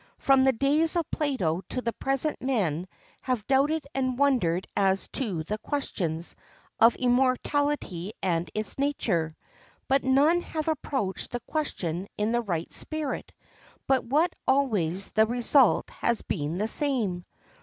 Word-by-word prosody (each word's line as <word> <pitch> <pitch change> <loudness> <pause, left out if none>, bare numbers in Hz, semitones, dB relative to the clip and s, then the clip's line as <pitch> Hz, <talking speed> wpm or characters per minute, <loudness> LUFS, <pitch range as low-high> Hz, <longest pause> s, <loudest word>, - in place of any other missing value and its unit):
From 270 -1 +4
the 265 - +5
days 290 +7 +3
of 340 -2 +1
Plato 195 - 0
to - - -2
the 235 -2 -2
present 275 +3 -1
men 185 - 0 0.3
have 250 -5 -2
doubted 280 +3 +2
and 260 -2 -1
wondered 225 -11 +2
as 195 -1 +2
to 200 - -2
the 210 +6 -4
questions 175 - -2 0.4
of 230 +1 +6
immortality 255 - 0
and 170 -2 -1
its 215 +4 -3
nature. 185 - 0 0.5
But 270 +1 +2
none 285 +6 +4
have 315 -2 -4
approached 265 -10 -2
the 245 - -3
question 190 - -3
in 210 +2 0
the 240 0 +1
right 175 -7 -3
spirit 310 -3 -3 0.5
but 265 -2 +2
what 300 +8 +1
always 200 -10 +2
the 220 0 +3
result 245 +2 +3
has 235 -1 -1
been 155 -1 -3
the 210 +3 0
same. 225 - 0
245 Hz, 140 wpm, -27 LUFS, 190-280 Hz, 0.5 s, of